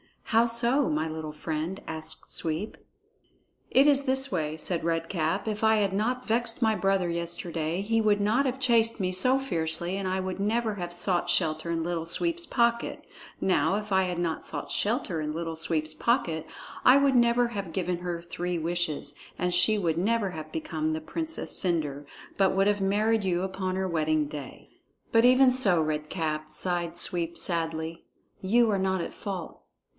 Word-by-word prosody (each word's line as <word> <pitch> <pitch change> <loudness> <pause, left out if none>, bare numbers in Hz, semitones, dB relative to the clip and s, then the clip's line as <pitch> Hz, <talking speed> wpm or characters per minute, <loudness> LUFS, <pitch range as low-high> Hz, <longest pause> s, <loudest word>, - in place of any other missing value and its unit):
"How 225 +1 +3
so, 235 +4 +2
my 155 +1 0
little 155 -1 -5
friend?" 160 +4 -4
asked 160 0 -5
Sweep. 165 +6 -3 0.9
"It 270 +2 +5
is 280 -1 +4
this 265 0 +2
way," 155 -3 -1
said 170 +1 +2
Red 165 0 -1
Cap. 160 -4 -1
"If 215 -1 -2
I 220 0 +4
had 205 -2 +1
not 250 +5 -1
vexed 230 0 0
my 220 -2 +3
brother 195 -3 +1
yesterday, 170 0 -3
he 225 +2 +1
would 210 -1 +2
not 225 +7 +2
have 260 0 -1
chased 230 -3 +3
me 185 -2 0
so 255 +9 +3
fiercely, 170 -7 -2
and 195 -1 -3
I 190 0 -1
would 185 0 -4
never 220 +1 0
have 175 -2 -5
sought 175 0 0
shelter 160 -2 +1
in 165 -1 -1
Little 170 -1 -2
Sweep's 340 - -2
pocket. 235 -1 0 0.4
Now, 165 -2 +2
if 210 0 -4
I 190 0 +4
had 180 -1 -2
not 170 -2 -2
sought 145 - -4
shelter 205 - 0
in 150 0 -3
Little 165 0 -4
Sweep's 155 -1 -1
pocket, 165 - 0 0.4
I 255 - +8
would 280 -1 +3
never 240 0 +4
have 200 -7 -5
given 180 -1 -1
her 175 -1 -4
three 175 +1 -3
wishes, 160 -3 -2 0.2
and 180 0 -1
she 180 +5 +4
would 165 -5 0
never 205 +1 +1
have 155 -2 -8
become 155 0 -2
the 160 - -3
Princess 320 - -2
Cendre, 150 -6 -1 0.3
but 195 -1 +3
would 195 +1 +3
have 205 -1 +1
married 210 +3 +2
you 180 -1 0
upon 190 -1 -3
her 190 0 -1
wedding 155 -3 +1
day." 145 -3 -9 0.4
"But 225 +1 +5
even 255 +1 +6
so, 200 -10 +2
Red 150 0 -3
Cap," 155 -3 -3
sighed 175 +1 -2
Sweep 170 -1 0
sadly, 165 -1 -2 0.3
"you 230 +4 +3
are 200 - +1
not 190 -1 0
at - - -5
fault. 190 - -6
180 Hz, 180 wpm, -27 LUFS, 165-220 Hz, 0.9 s, I